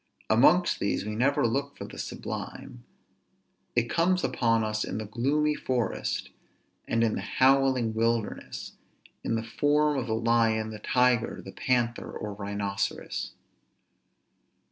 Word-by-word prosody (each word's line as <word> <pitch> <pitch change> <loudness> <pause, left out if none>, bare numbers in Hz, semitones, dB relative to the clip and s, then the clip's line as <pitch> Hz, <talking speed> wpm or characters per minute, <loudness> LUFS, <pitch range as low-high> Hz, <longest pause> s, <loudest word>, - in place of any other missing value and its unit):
Amongst 155 +11 +5
these 100 - -1
we 105 0 -3
never 130 +3 +2
look 135 +5 -1
for - - -6
the - - -10
sublime; - - -6 0.9
it 120 -1 +2
comes 180 +6 +2
upon 115 -1 +2
us 110 0 -1
in - - -4
the 110 - -4
gloomy 140 +8 +1
forest, 125 -5 -2 0.6
and 115 0 +2
in 110 -2 +2
the - - -2
howling 130 -3 +3
wilderness, 115 -1 -2 0.5
in - - 0
the 115 - -1
form 145 +4 +2
of 125 - -4
the 110 - 0
lion, 115 -1 +2
the 105 - -7
tiger, 125 0 +2
the - - -7
panther, 120 -2 0
or 105 -1 -5
rhinoceros. 100 0 -3
115 Hz, 135 wpm, -28 LUFS, 110-135 Hz, 0.9 s, Amongst